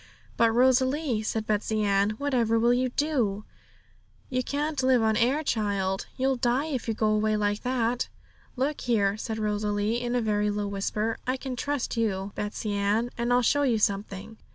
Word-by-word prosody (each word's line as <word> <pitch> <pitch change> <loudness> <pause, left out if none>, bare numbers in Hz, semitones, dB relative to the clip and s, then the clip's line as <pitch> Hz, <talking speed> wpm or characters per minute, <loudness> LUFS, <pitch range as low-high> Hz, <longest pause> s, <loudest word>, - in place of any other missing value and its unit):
'But, 230 -1 +4
Rosalie,' 260 +1 +2
said 220 0 -2
Betsey 215 0 0
Ann, 200 +1 +2
'whatever 240 -5 +1
will 235 +2 +4
you 255 +1 +1
do? 245 -8 -1 0.9
You 255 0 +1
can't 290 +2 -2
live 255 -3 +3
on 220 0 +2
air, 255 +7 +2
child; 200 -6 -1
you'll 265 0 +1
die 245 +4 +1
if 275 -7 -3
you 225 - -1
go 215 0 +1
away 215 0 +2
like 205 0 0
that!' 245 -1 0 0.5
'Look 275 +3 -1
here,' 205 -5 +1
said 220 +1 -4
Rosalie, 210 +1 -1
in 240 0 -2
a - - +3
very 210 -1 +1
low 205 0 -2
whisper, 205 +2 -2
'I 255 +1 0
can 260 -1 -5
trust 285 -1 -2
you, 200 -3 -1
Betsey 210 0 -3
Ann, 205 +4 0
and 235 +1 -1
I'll 245 0 +4
show 285 +5 +3
you 250 -5 +2
something.' 205 +1 -2
225 Hz, 175 wpm, -27 LUFS, 210-255 Hz, 0.9 s, But